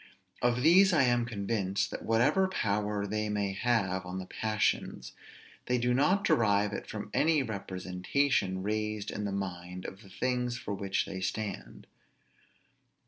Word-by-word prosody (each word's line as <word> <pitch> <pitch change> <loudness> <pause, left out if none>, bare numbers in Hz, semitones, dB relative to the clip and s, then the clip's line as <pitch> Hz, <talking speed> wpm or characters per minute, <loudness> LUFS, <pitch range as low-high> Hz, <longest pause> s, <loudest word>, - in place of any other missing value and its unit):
Of 120 0 +2
these 185 +4 +6
I 155 - +5
am 120 -1 +2
convinced, 100 -3 -1
that - - -6
whatever 135 +12 +3
power 105 - -1
they 105 +1 -2
may 100 -2 -1
have 100 -4 0
on 90 +1 -6
the 95 - -5
passions, 110 +2 -1 0.6
they 125 - +2
do 125 0 +1
not 185 +10 +3
derive 105 -2 +3
it - - -5
from 105 -1 -6
any 155 -3 +3
representation 95 +1 -1
raised 105 0 -2
in 105 - -4
the 100 - -2
mind 90 -2 -5
of 95 - -7
the 100 - -15
things 125 +3 -1
for - - -5
which 100 -1 -1
they 95 -1 -6
stand. 100 +2 -4
105 Hz, 150 wpm, -30 LUFS, 95-120 Hz, 0.6 s, these